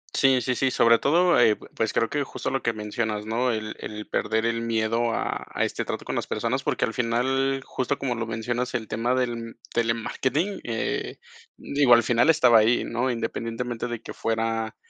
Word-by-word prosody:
Sí, 135 Hz, -2 st, +4 dB
sí, 125 Hz, +2 st, 0 dB
sí, 135 Hz, +2 st, +1 dB
sobre 115 Hz, -2 st, +4 dB
todo, 175 Hz, +4 st, +4 dB
eh 115 Hz, -3 st, +5 dB
pues 110 Hz, 0 st, -3 dB
creo 115 Hz, -, +1 dB
que 145 Hz, +3 st, -1 dB
justo -, -, -5 dB
lo 135 Hz, -, -1 dB
que 120 Hz, -, +1 dB
mencionas, 105 Hz, 0 st, -3 dB
¿no?, 120 Hz, +3 st, 0 dB
el 110 Hz, -1 st, -4 dB
el 105 Hz, 0 st, -6 dB
perder 110 Hz, 0 st, 0 dB
el 115 Hz, 0 st, 0 dB
miedo 115 Hz, 0 st, 0 dB
a -, -, -2 dB
a -, -, -1 dB
este -, -, -3 dB
trato -, -, -4 dB
con -, -, -4 dB
las -, -, -2 dB
personas, -, -, -1 dB
porque -, -, 0 dB
al -, -, -5 dB
final, 135 Hz, +3 st, 0 dB
justo 130 Hz, +2 st, -2 dB
como 130 Hz, -3 st, -2 dB
lo 115 Hz, -1 st, -4 dB
mencionas, 120 Hz, +3 st, -2 dB
el 110 Hz, -3 st, -2 dB
tema 120 Hz, +3 st, 0 dB
del 120 Hz, -2 st, -3 dB, 0.2 s
telemarketing, 125 Hz, -, -1 dB
eh, 115 Hz, -2 st, -2 dB, 0.4 s
digo, 140 Hz, -4 st, +4 dB
al 120 Hz, -, +3 dB
final 120 Hz, +6 st, +3 dB
estaba 125 Hz, -8 st, +6 dB
ahí, 115 Hz, +3 st, +3 dB
¿no?, 120 Hz, +3 st, -1 dB
independientemente 115 Hz, 0 st, -3 dB
de 120 Hz, -2 st, -5 dB
que -, -, -7 dB
fuera 115 Hz, 0 st, -2 dB
115 Hz, 195 wpm, -25 LUFS, 115-130 Hz, 0.4 s, estaba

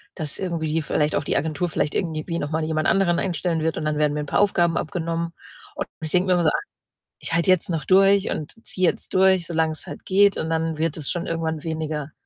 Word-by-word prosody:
dass 155 Hz, -2 st, -4 dB
irgendwie 170 Hz, -4 st, -2 dB
die 160 Hz, 0 st, +1 dB
vielleicht 150 Hz, 0 st, 0 dB
auch 145 Hz, -, 0 dB
die -, -, 0 dB
Agentur 160 Hz, +2 st, -1 dB
vielleicht 150 Hz, -, -1 dB
irgendwie 160 Hz, -4 st, -2 dB
wie 170 Hz, -1 st, -2 dB
noch 145 Hz, -, -3 dB
mal 160 Hz, 0 st, 0 dB
jemand 155 Hz, -1 st, 0 dB
anderen 180 Hz, -3 st, +3 dB
einstellen 170 Hz, -2 st, -1 dB
wird 160 Hz, 0 st, -1 dB
und 155 Hz, -, -3 dB
dann 155 Hz, -1 st, 0 dB
werden 150 Hz, -1 st, +2 dB
mir 150 Hz, -, -2 dB
'n -, -, -4 dB
paar -, -, 0 dB
Aufgaben 175 Hz, -4 st, +3 dB
abgenommen 170 Hz, +1 st, -2 dB, 0.4 s
und -, -, -3 dB
ich 155 Hz, -1 st, -4 dB
denke 180 Hz, +1 st, +2 dB
mir 180 Hz, -, +4 dB
immer 175 Hz, -1 st, +2 dB
so: 155 Hz, -, +5 dB
„Ach, -, -, -1 dB, 0.6 s
ich -, -, -1 dB
halte 170 Hz, +3 st, +3 dB
jetzt 185 Hz, 0 st, +2 dB
noch 160 Hz, -4 st, -2 dB
durch 195 Hz, +2 st, +4 dB
und 150 Hz, -, -4 dB
ziehe 185 Hz, -2 st, +1 dB
jetzt -, -, -10 dB
durch, 190 Hz, -2 st, +4 dB
solang's 160 Hz, -2 st, -1 dB
halt -, -, -9 dB
geht 200 Hz, +1 st, +4 dB
und 160 Hz, -, -2 dB
dann 160 Hz, -1 st, 0 dB
wird 165 Hz, -1 st, 0 dB
es 150 Hz, -4 st, -3 dB
schon 175 Hz, +1 st, -2 dB
irgendwann 160 Hz, -2 st, -2 dB
weniger.“ 155 Hz, -2 st, -3 dB
165 Hz, 245 wpm, -23 LUFS, 155-180 Hz, 0.6 s, so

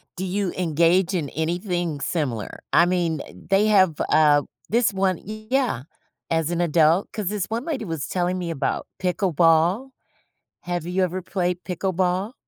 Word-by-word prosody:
do 185 Hz, -, -4 dB
you 190 Hz, 0 st, -1 dB
engage 170 Hz, +2 st, +2 dB
in 160 Hz, -6 st, -1 dB
anything 175 Hz, -1 st, -2 dB
similar? 130 Hz, -, -3 dB
I 170 Hz, -, +6 dB
mean, 175 Hz, -4 st, 0 dB
uh, -, -, -11 dB, 0.2 s
they 195 Hz, +2 st, +4 dB
have, 190 Hz, -7 st, +4 dB
uh, 150 Hz, -2 st, +5 dB, 0.3 s
this 230 Hz, -2 st, +2 dB
one 190 Hz, -2 st, +1 dB
e 215 Hz, +1 st, -9 dB
yeah, 255 Hz, -, +1 dB, 0.5 s
as 165 Hz, 0 st, 0 dB
an 175 Hz, 0 st, 0 dB
adult, 165 Hz, +2 st, +3 dB
'cause 210 Hz, -4 st, -4 dB
this 200 Hz, -1 st, -1 dB
one 230 Hz, +4 st, -4 dB
lady 270 Hz, -9 st, -3 dB
was 160 Hz, -5 st, -4 dB
telling 180 Hz, 0 st, -1 dB
me 175 Hz, -2 st, -4 dB
about 155 Hz, -, -2 dB
pickleball. 180 Hz, -, +2 dB, 0.7 s
Have 175 Hz, -2 st, -3 dB
you 185 Hz, +2 st, 0 dB
ever 185 Hz, +1 st, -2 dB
played 180 Hz, -1 st, -2 dB
pickleball? 185 Hz, +3 st, -1 dB
180 Hz, 160 wpm, -23 LUFS, 165-195 Hz, 0.7 s, I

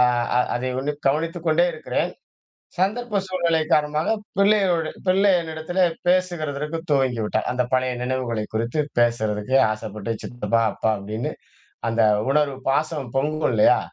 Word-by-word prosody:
அ -, -, +7 dB, 0.3 s
அ -, -, +5 dB, 0.2 s
அதை 125 Hz, +1 st, -2 dB
உன்னிப் 145 Hz, +2 st, -4 dB
கவனித்துக் 165 Hz, +4 st, -1 dB
கொண்டே 160 Hz, +2 st, +4 dB
இருக்கிறேன். 155 Hz, -1 st, -2 dB, 0.7 s
சந்தர்ப்ப 210 Hz, +3 st, 0 dB
சூழ்நிலை 170 Hz, -3 st, +1 dB
காரணமாக 150 Hz, +1 st, +2 dB, 0.3 s
பிள்ளையோட 195 Hz, -5 st, +3 dB, 0.2 s
பிள்ளை 195 Hz, +2 st, +4 dB
என்னிடத்திலே 165 Hz, +3 st, -1 dB, 0.2 s
பேசுகிறதற்கு 165 Hz, -4 st, 0 dB
துவங்கிவிட்டா. 125 Hz, -6 st, +1 dB
அந்த 125 Hz, 0 st, +1 dB
பழைய 130 Hz, 0 st, +2 dB
நினைவுகளை 125 Hz, -3 st, -2 dB
குறித்து 115 Hz, +6 st, -1 dB, 0.2 s
பேசுறதுக்கு 115 Hz, 0 st, +1 dB, 0.2 s
ஆசைப்பட்டு, 110 Hz, 0 st, -5 dB
'சித்தப்பா! 115 Hz, -1 st, -1 dB
அப்பா!' 110 Hz, -, 0 dB
அப்பிடின்னு, 105 Hz, +4 st, -4 dB, 0.6 s
அந்த 115 Hz, 0 st, +1 dB, 0.3 s
உணர்வு, 145 Hz, -1 st, +2 dB
பாசம் 145 Hz, -2 st, -1 dB
பொங்கும் 155 Hz, +3 st, +1 dB
இல்லயா? 105 Hz, -, +5 dB
150 Hz, 125 wpm, -23 LUFS, 120-165 Hz, 0.7 s, அ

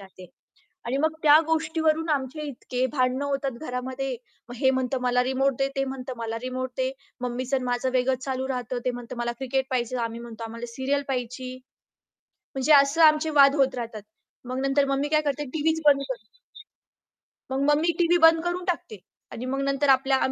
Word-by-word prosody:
राहते. 190 Hz, -1 st, -13 dB, 0.6 s
आणि 255 Hz, +3 st, -1 dB
मग 315 Hz, +2 st, +1 dB
त्या 300 Hz, +1 st, +8 dB
गोष्टीवरून 320 Hz, 0 st, +1 dB
आमचे 285 Hz, 0 st, -1 dB
इतके 255 Hz, -1 st, -3 dB
भांडणं 255 Hz, 0 st, 0 dB
होतात 275 Hz, -1 st, -1 dB
घरामध्ये, 260 Hz, -1 st, -4 dB, 0.3 s
मग 245 Hz, -, -7 dB
हे 265 Hz, +2 st, +3 dB
म्हणतं 260 Hz, 0 st, -1 dB
मला 250 Hz, 0 st, +2 dB
रिमोट 265 Hz, +1 st, +1 dB
दे, 270 Hz, -, +2 dB
ते 270 Hz, -, +1 dB
म्हणतं 265 Hz, -1 st, -5 dB
मला 230 Hz, 0 st, -3 dB
रिमोट 255 Hz, 0 st, -3 dB
दे, 260 Hz, 0 st, 0 dB, 0.3 s
मम्मीचं 250 Hz, +2 st, -2 dB
आणि 260 Hz, -, -4 dB
माझं 245 Hz, +1 st, 0 dB
वेगळंच 255 Hz, +1 st, +1 dB
चालू 265 Hz, -1 st, -2 dB
राहतं, 250 Hz, -1 st, -3 dB
ते 250 Hz, -, +2 dB
म्हणतं 245 Hz, 0 st, -8 dB
मला 240 Hz, 0 st, -1 dB
क्रिकेट 265 Hz, 0 st, -1 dB
पाहिजे, 250 Hz, -1 st, -1 dB
आम्ही 230 Hz, 0 st, -6 dB
म्हणतो 235 Hz, -1 st, -9 dB
आम्हाला 230 Hz, +1 st, -6 dB
सीरियल 280 Hz, +2 st, 0 dB
पाहायची. 255 Hz, 0 st, -4 dB, 1.0 s
म्हणजे 270 Hz, +3 st, +2 dB
असं 280 Hz, +4 st, +1 dB
आमचे 310 Hz, 0 st, +5 dB
वाद 275 Hz, 0 st, +7 dB
होत 270 Hz, -1 st, +2 dB
राहतात. 230 Hz, -3 st, -5 dB, 0.5 s
मग 255 Hz, -, -3 dB
नंतर 275 Hz, +1 st, +3 dB
मग 275 Hz, 0 st, +1 dB
मी 290 Hz, -, -1 dB
काय 305 Hz, 0 st, +3 dB
करते 295 Hz, +2 st, -4 dB
टीव्हीच 320 Hz, +1 st, +1 dB
बंद 280 Hz, -1 st, +6 dB
करते. 235 Hz, -, -8 dB, 1.1 s
मग 265 Hz, +1 st, -1 dB
मग 295 Hz, -, +4 dB
मी 340 Hz, +2 st, +2 dB
टीव्ही 345 Hz, 0 st, +4 dB
बंद 325 Hz, 0 st, +2 dB
करून 350 Hz, +1 st, -2 dB
टाकते 335 Hz, -, -3 dB, 0.3 s
आणि 235 Hz, -, -6 dB
मग 270 Hz, +1 st, -2 dB
नंतर 275 Hz, +1 st, 0 dB
आपल्या 270 Hz, 0 st, +4 dB
265 Hz, 185 wpm, -25 LUFS, 250-285 Hz, 1.1 s, त्या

